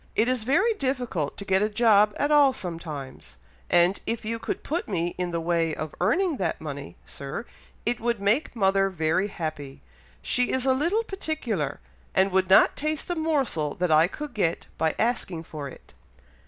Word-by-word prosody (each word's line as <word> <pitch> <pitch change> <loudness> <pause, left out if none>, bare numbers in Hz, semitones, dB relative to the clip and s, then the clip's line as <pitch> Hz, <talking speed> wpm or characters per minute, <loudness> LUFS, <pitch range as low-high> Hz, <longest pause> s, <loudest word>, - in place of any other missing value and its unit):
It 225 - +3
is 250 -3 0
very 355 - +3
difficult 250 - -2
to 200 - -6
get 190 -1 +2
a 210 - +2
job 210 -2 +4
at 290 - 0
all 285 -3 +6
sometimes, 150 - -7 0.3
and 175 +2 +4
if 230 -1 -2
you 230 +1 -2
could - - -4
put 335 +4 -2
me 175 -3 -1
in 180 -1 -1
the 170 -1 -2
way 165 -1 0
of 155 -1 -5
earning 315 - +2
that 180 -6 -1
money, 145 -3 -7
Sir, 140 +11 -6 0.4
it 240 0 0
would 235 -1 -1
make 215 +9 +1
mother 195 -2 +3
very 170 +2 0
happy. 155 -7 -6 0.4
She 250 - +2
is 260 0 +1
a 265 - +4
little 340 +12 +1
particular, 310 - -3 0.4
and 190 +1 +3
would 185 0 +2
not 190 - +6
taste 305 +3 -2
a - - 0
morsel 275 - 0
that 180 -2 0
I 155 +2 +6
could 295 +9 -7
get 175 -5 0
by 160 -1 0
asking 215 -8 -1
for 150 -3 -7
it." - - -15
200 Hz, 180 wpm, -26 LUFS, 165-255 Hz, 0.4 s, all